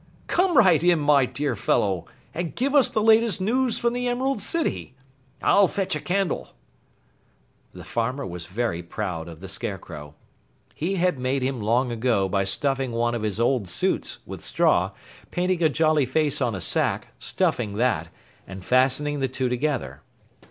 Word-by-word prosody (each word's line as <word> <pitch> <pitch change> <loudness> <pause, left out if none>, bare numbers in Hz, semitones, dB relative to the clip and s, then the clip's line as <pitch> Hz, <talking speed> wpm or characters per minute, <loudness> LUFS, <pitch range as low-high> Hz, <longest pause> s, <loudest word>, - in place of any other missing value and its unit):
Come 360 -2 +2
right 180 -8 +5
in, 175 -1 +4
my 145 -3 +3
dear 140 -2 -2
fellow, 100 -4 0 0.3
and 170 0 -4
give 270 +3 0
us 280 -4 +5
the 215 - 0
latest 225 -2 +4
news 240 +5 +1
from 235 0 0
the 245 0 -1
Emerald 260 +3 0
City. 330 - -1 0.5
I'll 200 -1 +5
fetch 195 -4 -1
a - - -2
candle!" 185 0 -2 1.2
The - - -10
farmer 125 +4 -2
was 90 -1 -7
very 95 -2 -2
proud 85 -2 -5
of 85 -1 -11
the 95 - -7
Scarecrow. 85 -6 -7 0.6
He 180 +5 -2
had 180 -5 +1
made 130 +1 -1
him 130 -2 -2
long 120 +4 +1
ago 115 -4 +1
by 95 +1 0
stuffing 135 +3 -1
one 120 +1 0
of 120 - -2
his 105 -1 -3
old 120 -5 +1
suits - - -1
with - - -8
straw, - - +2 0.4
painting 180 0 0
a 160 - +4
jolly 155 -3 +2
face 150 -3 0
on 120 -5 0
a 95 - -5
sack, - - 0
stuffing 110 -5 0
that, 105 -8 0 0.4
and 95 0 -9
fastening 135 +3 +2
the 135 - +1
two 130 0 -2
together. 125 - -2
130 Hz, 165 wpm, -24 LUFS, 110-175 Hz, 1.2 s, right